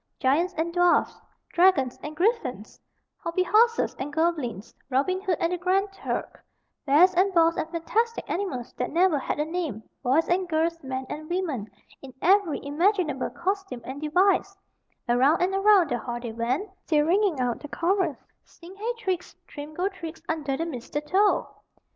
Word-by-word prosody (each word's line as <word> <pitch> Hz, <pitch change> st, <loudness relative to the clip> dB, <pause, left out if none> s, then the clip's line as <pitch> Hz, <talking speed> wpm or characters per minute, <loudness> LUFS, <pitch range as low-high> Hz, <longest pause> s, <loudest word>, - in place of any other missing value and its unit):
Giants 330 Hz, +8 st, +1 dB
and 330 Hz, +2 st, -1 dB
dwarfs, 355 Hz, 0 st, +2 dB, 0.3 s
dragons 340 Hz, -8 st, +3 dB
and 300 Hz, +1 st, -7 dB
griffins, 310 Hz, -, -1 dB, 0.4 s
hobby 335 Hz, +2 st, -1 dB
horses 460 Hz, +5 st, +3 dB
and 275 Hz, +2 st, -4 dB
goblins, 290 Hz, -, -1 dB, 0.2 s
Robin 285 Hz, +9 st, +1 dB
Hood 375 Hz, -4 st, 0 dB
and 335 Hz, +1 st, 0 dB
the 355 Hz, -, -2 dB
Grand 385 Hz, +2 st, +1 dB
Turk, -, -, -5 dB, 0.4 s
bears 335 Hz, +7 st, +6 dB
and 375 Hz, +3 st, +3 dB
boars 330 Hz, 0 st, +5 dB
and 315 Hz, -, -3 dB
fantastic 445 Hz, +8 st, -1 dB
animals 350 Hz, -11 st, -3 dB
that 250 Hz, -, -2 dB
never 340 Hz, -2 st, +3 dB
had 270 Hz, -, -3 dB
a 300 Hz, -, +1 dB
name, 315 Hz, -, -4 dB, 0.2 s
boys 275 Hz, +6 st, +2 dB
and 360 Hz, +1 st, 0 dB
girls, 330 Hz, +1 st, 0 dB
men 260 Hz, 0 st, -4 dB
and 310 Hz, +1 st, -7 dB
women, 320 Hz, -, -2 dB, 0.3 s
in 265 Hz, -2 st, -11 dB
every 370 Hz, -4 st, +2 dB
imaginable 315 Hz, -2 st, +1 dB
costume 385 Hz, -7 st, -3 dB
and 270 Hz, +3 st, -7 dB
device 380 Hz, +5 st, +2 dB, 0.5 s
around 260 Hz, +7 st, +4 dB
and 365 Hz, +2 st, +1 dB
around 390 Hz, -4 st, +4 dB
the 240 Hz, -, 0 dB
hall 240 Hz, +1 st, -5 dB
they 240 Hz, -1 st, -6 dB
went, 245 Hz, -, -1 dB, 0.2 s
still 300 Hz, -2 st, +3 dB
ringing 365 Hz, -2 st, +2 dB
out 245 Hz, -2 st, 0 dB
the 295 Hz, -, -8 dB
chorus: 370 Hz, +6 st, 0 dB, 0.3 s
"Sing 345 Hz, +2 st, -15 dB
hey 445 Hz, +4 st, -2 dB
trix, 375 Hz, -5 st, -3 dB
trim 295 Hz, 0 st, -9 dB
go 360 Hz, +3 st, 0 dB
trix, 335 Hz, -5 st, -7 dB
Under 295 Hz, -4 st, -2 dB
the 330 Hz, -, -2 dB
mistletoe!" 300 Hz, -, 0 dB
335 Hz, 165 wpm, -26 LUFS, 280-375 Hz, 0.5 s, bears